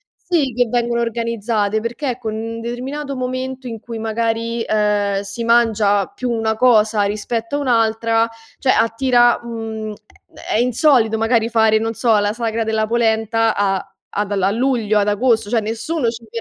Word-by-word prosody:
sì, 290 -8 -1
che 245 -1 +2
vengono 235 0 0
organizzate 225 -2 -1
perché 240 +2 -3
con 220 -3 -4
un 230 +1 -5
determinato 270 +4 -5
momento 255 0 -4
in 225 -2 -6
cui 230 -1 -7
magari, 230 +1 -1
ehm, 205 -2 +1
si 205 +4 -6
mangia 220 -4 +3
più 250 -1 -4
una 220 -1 0
cosa 220 -3 +3
rispetto 225 +5 -2
a - - -2
un'altra, 230 -2 +2 0.3
cioè, 265 - -1
attira 240 +2 +3
mhmm, 220 -2 -5 0.4
è - - -6
è - - +3
insolito 245 -3 +3
magari 225 0 +1
fare, 220 -1 +3
non 225 +1 -2
so, 225 -2 +2
la 205 0 +1
sagra 230 -1 -2
della 220 -1 0
polenta 225 -1 +1
a 195 -1 0 0.3
ad 205 0 -1
a 195 0 +1
luglio, 230 -3 +1
ad 205 +1 +1
agosto, 225 0 +1
cioè 230 -1 +2
nessuno 235 +6 -2
ci 230 0 -8
ve 230 - -5
225 Hz, 165 wpm, -19 LUFS, 220-240 Hz, 0.4 s, mangia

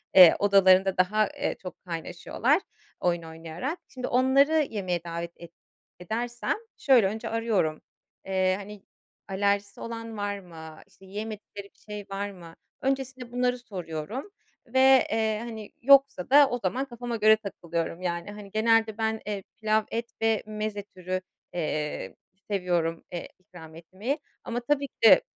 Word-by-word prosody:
eee, 180 -3 +10
odalarında 190 -1 +5
daha, 210 +4 +3
eee, - - -2
çok 185 0 -9
kaynaşıyorlar 175 - 0 0.4
oyun 175 -2 0
oynayarak. 165 - -5
Şimdi 255 -1 -5
onları 275 +5 +4
yemeğe 185 -5 -2
davet 170 0 -5
et 170 -1 -12 0.5
edersem 235 +6 -2 0.2
şöyle 250 -8 +5
önce 215 +3 -4
arıyorum, 220 -9 0 0.4
eee, 185 -1 +2
hani, 205 0 -10 0.4
alerjisi 200 +1 0
olan 230 -1 -6
var 205 0 -2
mı, 160 -4 -11
işte, 190 - -20
yiyemedikleri 210 0 -7
bir - - -34
şey 210 -1 -8
var 200 +1 -3
mı? 170 -3 -12 0.3
Öncesinde 265 -2 -2
bunları 250 0 +1
soruyorum 200 - -6 0.3
ve, 260 +2 0 0.3
eee, 220 -1 +1
hani, 220 -3 -7
yoksa 275 -6 +5
da 285 0 +7
o 245 - -2
zaman 250 +9 0
kafama 240 -2 -5
göre 220 0 +6
takılıyorum. 170 -4 -4
Yani, 175 +2 -3
hani, 205 -1 -10
genelde 220 0 +3
ben, 220 0 -1
eee, 200 -2 -3
pilav 215 0 +2
et 235 +1 -3
ve 225 -1 +2
meze 215 -1 -4
türü, 185 -1 -4 0.3
eee, 150 - -3 0.4
seviyorum, 175 -4 0
eee, 175 - -5
ikram 175 -4 -13
etmeyi 190 - -4 0.2
ama, 235 +1 -2
tabii, 280 +3 0
ki - - -56
de, 225 - +9
205 Hz, 145 wpm, -27 LUFS, 180-235 Hz, 0.5 s, eee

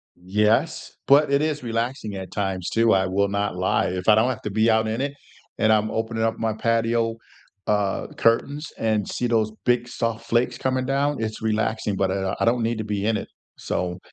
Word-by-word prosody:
Yes, 105 +4 0
but 140 +1 +5
it 140 - +3
is 150 -3 -1
relaxing 115 -2 -3
at 95 -1 -7
times, 95 -3 -2
too, 115 -1 +3
I 95 -1 +2
will 100 +2 +1
not 100 -1 -1
lie. 90 +1 +1
If 90 +2 -4
I 105 - +7
don't 115 +4 +3
have - - -3
to 105 - -3
be 110 +2 +3
out 110 0 +3
in 115 +4 -2
it 140 0 -2 0.4
and 110 0 +3
I'm 110 0 +2
opening 110 0 -2
up 115 0 0
my 110 -1 -1
patio, 115 0 0 0.5
uh, 105 -2 0
curtains 140 +6 +1
and 110 -2 0
see 125 - -2
those 110 -2 +1
big, 120 0 +2
soft 115 -1 -3
flakes 120 +2 +1
coming 130 -1 -1
down, 140 -1 0
it's 110 0 -4
relaxing, 110 -1 0
but, 95 -1 0
uh, 95 0 -1
I - - +2
don't 120 +1 +2
need 115 0 0
to - - -2
be 105 -1 -2
in 115 - +2
it. - - -6 0.3
So 90 0 -3
110 Hz, 210 wpm, -24 LUFS, 105-120 Hz, 0.5 s, I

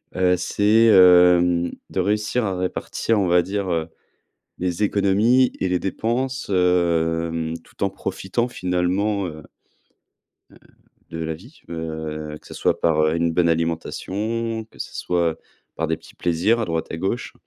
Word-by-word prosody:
heu, 90 0 +3
c'est 105 +5 +3
hem, 90 -3 +6 0.2
de - - -3
réussir 105 +4 0
à 95 -2 -2
répartir 100 +4 -1
on 95 - +1
va 90 0 +4
dire, 100 0 -3
heu, 80 -1 -1 0.7
les 90 +2 -1
économies 105 +6 +3
et - - +1
les 90 -1 +1
dépenses, 125 +7 -2
hem, 85 -3 +1
tout - - -7
en 100 - +2
profitant 95 +4 -3
finalement, 95 +1 -1
heu 80 -2 -9 1.1
heu, - - -17 0.5
de 80 - -6
la 80 0 -2
vie, 120 - -15
heu, 80 -2 -5
que - - -17
ça - - -10
soit - - 0
par, 80 -2 +2
heu, 80 +1 +2
une 85 0 +1
bonne 85 0 +2
alimentation 105 +8 -2
que - - -19
ça - - -5
soit 85 -2 -1 0.4
par 80 - -2
des 80 0 -1
petits 80 - -17
plaisirs 90 +7 +1
à 115 - 0
droite 80 -2 -2
à 80 - -4
gauche, 95 +8 -3
90 Hz, 160 wpm, -22 LUFS, 85-105 Hz, 1.1 s, hem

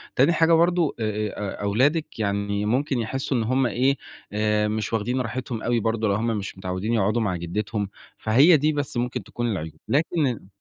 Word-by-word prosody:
تاني 140 +7 +4
حاجة 165 +1 +4
برضه 170 -1 +3
أ - - -1
أ 105 -2 -3
أ - - -4
أولادِك 130 +8 +1
يعني 100 0 -1
ممكن 130 +3 0
يحسّوا 130 +3 -2
إن 115 - +1
هُم 130 +3 +1
إيه 130 +3 +1 0.4
آآ 105 0 +1
مش 110 +1 -2
واخدين 120 +4 0
راحتهم 120 -1 -4
أوي 120 0 +1
برضه 115 0 0
لو 100 - +2
هُم 115 +3 -1
مش 95 -1 -6
متعودين 95 +4 -3
يقعدوا 110 +1 +2
مع 95 -4 0
جدّتهم، 100 +4 -3 0.3
فهي 140 +10 +5
دي 150 +2 +2
بس 145 -4 -3
ممكن 125 +1 -2
تكون 120 -1 -3
العيوب 80 -5 -4 0.2
لكن 155 +3 +2
ال 120 -6 -4
115 Hz, 190 wpm, -24 LUFS, 105-135 Hz, 0.4 s, فهي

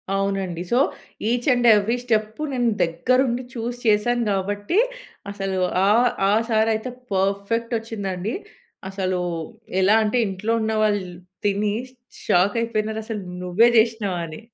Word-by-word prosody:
అవునండి. 195 -3 -1
So, 240 - +3 0.5
each 245 +3 -1
and 245 -1 +2
every 215 +4 +1
step, 220 +1 -1
నేను 245 -3 +1
దగ్గరుండి 245 +9 +1
చూసి 240 +1 -4
చేశాను 235 +3 +2
గాబట్టి, 205 - -1 0.5
అసలు 195 -1 -3 0.3
ఆహ్, 235 +4 +5 0.2
ఆ - - +4 0.2
సారైతే 220 +2 +1 0.2
పర్ఫెక్ట్ 200 +5 0
వచ్చిందండి. 205 -2 -4 0.6
అసలూ 185 -2 -2 0.6
ఎలా 200 +3 +5
అంటే, 215 +3 0
ఇంట్లో 195 +4 -2
ఉన్నవాళ్ళు 215 -3 +1 0.4
తిని 205 +1 +1 0.5
షాక్ 185 +4 +3
అయిపోయినారు. 220 -1 -2
"అసలు 220 -3 -4 0.2
నువ్వే 180 +6 +4
చేేషినవా" 220 -4 +2
అని. 155 -1 -9
215 Hz, 120 wpm, -23 LUFS, 195-230 Hz, 0.6 s, ఆహ్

